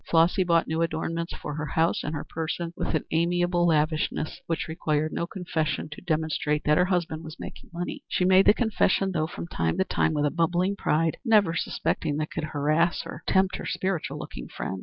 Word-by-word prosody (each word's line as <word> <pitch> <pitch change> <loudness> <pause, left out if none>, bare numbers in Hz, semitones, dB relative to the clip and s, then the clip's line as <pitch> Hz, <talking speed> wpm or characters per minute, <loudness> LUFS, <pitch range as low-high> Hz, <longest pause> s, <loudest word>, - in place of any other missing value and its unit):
Flossy 170 +4 +4
bought 170 -2 +2
new 160 +1 -1
adornments 165 +1 -2
for 150 - -6
her 150 +1 -3
house 160 +4 +1
and 155 - -3
her 145 - -3
person 165 +1 -4
with - - -1
an 155 - 0
amiable 175 +1 +2
lavishness 155 -1 0
which 165 -2 -1
required 155 -1 -1
no 170 - -2
confession 160 -6 -2
to 150 - -8
demonstrate 155 -3 0
that 150 - +4
her 180 - +5
husband 175 -3 -1
was 160 +1 -9
making - - -9
money. 175 +1 -5
She 180 - +1
made 190 +1 +6
the - - +9
confession, 200 -4 +2
though, 155 -3 0
from 170 - -6
time 80 - -1
to - - +3
time 160 - +1
with 150 0 +1
a 145 - +1
bubbling 175 +3 +1
pride, 160 -3 +1
never 210 -8 +4
suspecting 155 -2 -1
that 155 0 -2
it - - -38
could - - -3
harass 155 +3 +1
or - - -8
tempt 190 0 +3
her - - -7
spiritual 185 -3 -2
looking - - -7
friend. 95 - -5
165 Hz, 205 wpm, -26 LUFS, 155-175 Hz, -, the